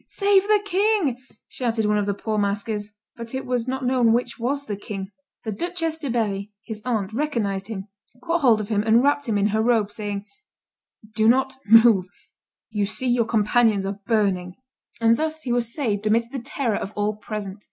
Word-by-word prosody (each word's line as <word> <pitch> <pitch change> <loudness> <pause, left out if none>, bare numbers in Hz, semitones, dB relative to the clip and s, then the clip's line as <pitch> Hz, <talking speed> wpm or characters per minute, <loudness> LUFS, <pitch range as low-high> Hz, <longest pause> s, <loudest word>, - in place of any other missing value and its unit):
"Save 400 -1 +3
the 425 -1 +5
king!" 380 - +1 0.2
shouted 230 -3 -1
one 210 0 +2
of 205 - -1
the 200 - 0
poor 215 +1 -2
masquers; 205 +1 -2 0.3
but 230 +2 -7
it 265 - -4
was 250 -1 -1
not 260 0 -2
known 245 -3 +3
which 240 0 -1
was 280 +4 -1
the 210 - -3
king. 195 -1 -7 0.3
The 220 - -3
Duchess 330 - -3
de 290 -4 -4
Berry, 210 -4 -1
his 220 -2 -7
aunt, 220 -5 -1
recognized 215 -8 -1
him, 205 -3 -6 0.3
caught 330 +6 -1
hold 235 -6 +5
of 210 - -7
him, 210 -2 +1
and 225 +3 +4
wrapped 285 0 +2
him 210 - +2
in 205 +1 +2
her 215 +1 +1
robe, 220 -3 +2
saying, 205 -1 -4 0.9
"Do 220 -1 +2
not 265 +2 +2
move; 225 -4 +6 0.6
you 205 -2 0
see 255 +4 -2
your 240 -1 +2
companions 220 -2 +2
are 200 +1 -4
burning." 195 -5 +1 0.4
And 230 0 +4
thus 315 0 -2
he 250 - -3
was 240 -1 0
saved 215 -7 -1
amidst 230 +2 +1
the 275 - -4
terror 235 -2 -2
of 205 - -5
all 210 0 0
present. 210 -2 -6
225 Hz, 195 wpm, -23 LUFS, 205-255 Hz, 0.9 s, move